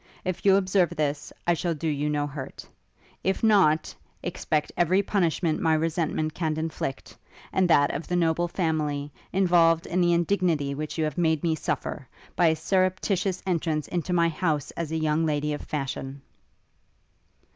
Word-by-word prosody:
If 185 -1 -3
you 195 - +7
observe 190 -2 +2
this, 145 -1 -2
I 175 - +3
shall 170 0 -1
do 160 +2 -3
you 150 -1 0
no 145 -1 0
hurt; 140 -2 -8 0.6
if 190 +3 0
not, 185 -8 +4 0.3
expect 155 -3 -1
every 185 +3 +3
punishment 170 -5 0
my 160 -1 +3
resentment 155 -1 -1
can 160 -2 -2
inflict, 160 -4 -4 0.4
and 185 -2 +2
that 145 -3 +4
of 160 - -5
the 180 - -1
noble 170 0 +2
family, 150 -5 -1 0.2
involved 170 -3 +3
in 180 +2 0
the 175 0 +4
indignity 170 -5 +1
which 150 +3 -5
you 160 - +1
have 155 +1 -2
made 160 -3 +1
me 165 -2 +2
suffer, 145 -3 -3 0.3
by 175 - +4
a 160 - +3
surreptitious 185 +2 0
entrance 165 -4 -1
into 180 0 -2
my 170 -1 +3
house 155 -4 -1
as 165 -2 -5
a 160 - -1
young 155 0 +1
lady 150 -1 0
of 145 - -5
fashion.' 135 -1 -5
160 Hz, 165 wpm, -26 LUFS, 150-175 Hz, 0.6 s, you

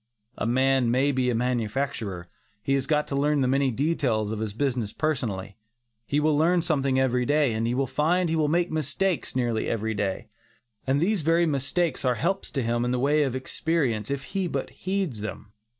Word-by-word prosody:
A - - -2
man 130 0 +2
may 130 +4 +2
be 130 -2 +1
a 120 - +1
manufacturer; 115 -5 -2 0.4
he 135 - +1
has 135 -1 0
got 150 0 +1
to 140 - -2
learn 145 +1 +2
the 130 - +2
many 135 +1 +2
details 125 -5 0
of 110 - -3
his 110 -1 -2
business 125 -5 -1
personally; 110 -11 -2 0.5
he 145 - +1
will 150 0 +2
learn 170 +3 +3
something 135 -5 +1
every 125 -1 +2
day, 145 -1 +2
and 110 +1 -1
he 120 - 0
will 135 +1 +1
find 170 +7 +1
he 165 - 0
will 155 -2 +2
make 170 +3 +1
mistakes 160 +4 -1
nearly 120 -3 0
every 110 0 -1
day. 100 -2 -2 0.6
And 135 +2 +2
these 200 +1 +1
very 165 +3 +3
mistakes 155 +3 0
are 125 -2 +2
helps 175 - -1
to 135 - -1
him 120 +1 0
in 120 - 0
the 125 - 0
way 145 +4 +2
of 135 -4 0
experiences 130 -4 -1
if 140 - -10
he 195 -2 0
but 135 -5 -3
heeds 185 - -3
them. 105 -1 -7
135 Hz, 200 wpm, -26 LUFS, 120-155 Hz, 0.6 s, learn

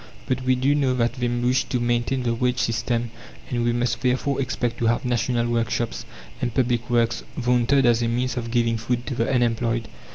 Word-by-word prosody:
But 130 0 -1
we 130 0 +2
do 130 +3 +2
know 135 -3 +1
that 120 -1 +1
they 125 -1 -2
wish 120 +1 +1
to 125 - -1
maintain 120 +2 0
the 120 -1 +1
wage 125 +1 0
system, 115 +1 -1 0.4
and 120 -1 0
we 120 - +2
must 120 0 -1
therefore 130 +2 0
expect 120 -2 -2
to 115 - +1
have 120 +3 +1
"national 120 0 0
workshops" 120 0 -1 0.4
and 120 - 0
"public 120 0 0
works" 115 -1 +1 0.2
vaunted 125 +2 +3
as 120 -1 +4
a 115 - +1
means 125 +2 -1
of 115 -2 -3
giving 115 -1 +1
food 120 +2 -2
to 140 - -3
the 115 0 0
unemployed. 115 -2 +1
120 Hz, 200 wpm, -23 LUFS, 115-125 Hz, 0.4 s, as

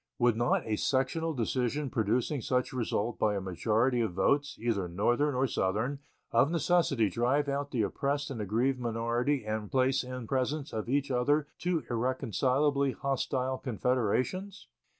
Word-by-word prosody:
Would 120 -2 +3
not 120 +2 +1
a 110 -1 -1
sectional 145 +7 0
decision 130 +3 -1
producing 120 +5 0
such 125 +3 0
result 115 -2 -1
by 105 -1 +2
a - - 0
majority 110 +7 +1
of 110 -6 -1
votes, 140 +10 +1
either 110 -6 -1
Northern 120 - +1
or 130 +2 +2
Southern, 110 +5 -1 0.3
of 140 - +4
necessity 165 -8 +2
drive 125 +8 +1
out 140 0 -2
the 120 -6 0
oppressed 140 +6 -1
and 115 -5 -4
aggrieved 120 +6 0
minority 120 +2 0
and 110 -1 -3
place 130 0 +2
in 125 -1 -6
presence 140 +3 -1
of 110 +1 -3
each 140 +1 0
other 145 +4 +2
two 175 -3 0
irreconcilably 130 +3 +1
hostile 130 -1 -1
confederations? 130 - -1
125 Hz, 150 wpm, -30 LUFS, 115-140 Hz, 0.3 s, of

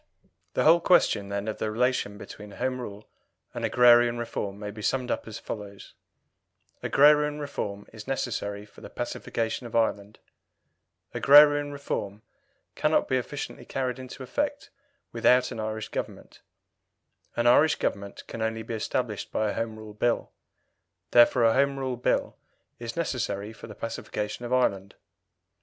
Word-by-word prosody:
The - - +2
whole 165 +2 +7
question, 105 - +3
then, 100 +1 -3
of 110 - -4
the 110 - -1
relation 115 -2 0
between 105 0 -10
Home 130 0 -2
Rule 105 -2 -8 0.5
and - - -5
agrarian 120 -1 +5
reform 105 -4 -4
may 105 0 -6
be 105 +1 -9
summed 125 +3 -1
up - - -3
as 110 - -6
follows: 100 -2 -8 0.9
Agrarian 150 +1 +4
reform 105 -8 -5
is 110 0 -10
necessary 105 -6 -3
for 105 - -18
the - - -9
pacification 115 +2 -3
of 115 - -9
Ireland; 105 -2 0 1.0
agrarian 145 0 +6
reform 110 -7 -4 0.5
cannot 155 +1 +1
be 130 - +1
efficiently 140 +3 -5
carried 130 -2 -3
into 130 +1 -8
effect 285 - -3 0.4
without 125 +2 +3
an - - -6
Irish 110 0 -4
Government; - - -6 0.9
an 120 - 0
Irish 145 +6 +5
Government 100 0 -4
can 115 - -7
only 110 0 -2
be 115 - -6
established 110 -1 -3
by 110 -1 0
a - - -4
Home 115 -1 -3
Rule 110 -1 -10
Bill: 120 +3 0 0.8
therefore 120 0 +6
a 115 -1 +5
Home 140 +1 +2
Rule 130 -2 -2
Bill 125 - 0 0.4
is 115 -1 -6
necessary 110 -10 -2
for 110 - -11
the 105 - -10
pacification 110 0 -5
of 120 - -6
Ireland. 100 -6 +1
115 Hz, 150 wpm, -27 LUFS, 105-130 Hz, 1.0 s, whole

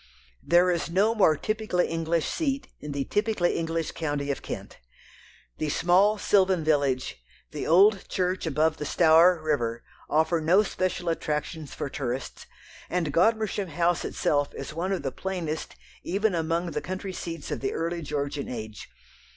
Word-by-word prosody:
There 175 +1 +4
is 170 -1 -1
no 200 +6 +3
more 175 -9 +4
typically 215 -3 0
English 165 -1 -1
seat 280 -4 -2
in 150 - -7
the 140 -1 -1
typically 210 -1 0
English 165 0 -2
county 145 -3 -2
of 135 - -4
Kent. - - -7 0.8
The 155 - -1
small 185 +7 +3
sylvan 190 -4 +3
village, 140 - 0 0.3
the 150 - -4
old 195 +4 +5
church 185 -1 -1
above 155 +1 +1
the 150 - -4
Stour 165 +2 +5
river, 120 -7 -1 0.3
offer 160 +2 +2
no 180 +7 +4
special 185 -2 -2
attractions 155 -1 -3
for - - -3
tourists, 130 -1 -5 0.4
and 165 -5 -1
Godmersham 210 +2 +2
House 170 +1 0
itself 145 -1 0
is 140 +2 -6
one 175 +4 -2
of 190 -6 -1
the 135 - -2
plainest 170 -1 -4 0.3
even 200 +3 0
among 170 +1 -1
the 150 0 -3
country 185 +4 -5
seats 165 -3 -6
of - - -2
the 135 - -2
early 170 +1 -2
Georgian 145 -1 -3
age. 110 -3 -7
165 Hz, 155 wpm, -26 LUFS, 150-185 Hz, 0.8 s, old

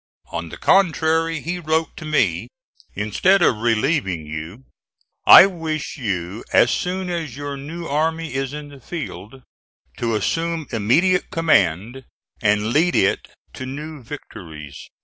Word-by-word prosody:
On 85 0 -4
the - - -9
contrary, 165 -3 +2
he 175 +4 -3
wrote 160 0 -1
to 155 - -8
me, 155 0 +1 0.5
"Instead 175 - +2
of 115 - +3
relieving 110 - 0
you, 80 +10 -7 0.6
I - - +11
wish 160 -5 -4
you, 100 - -4
as - - +5
soon 185 0 -2
as 160 -7 -4
your 145 -1 -5
new 160 +5 -7
army 160 +2 -1
is 135 0 -2
in 150 0 -7
the 140 -1 -13
field, 130 - -8 0.5
to 115 -2 -1
assume 165 +7 -1
immediate 160 - +2
command, 120 - +1 0.4
and 105 +1 +1
lead 165 +4 +3
it 95 - +2 0.3
to 130 - -7
new 150 +2 -7
victories." 80 - -10
145 Hz, 135 wpm, -21 LUFS, 105-165 Hz, 0.6 s, I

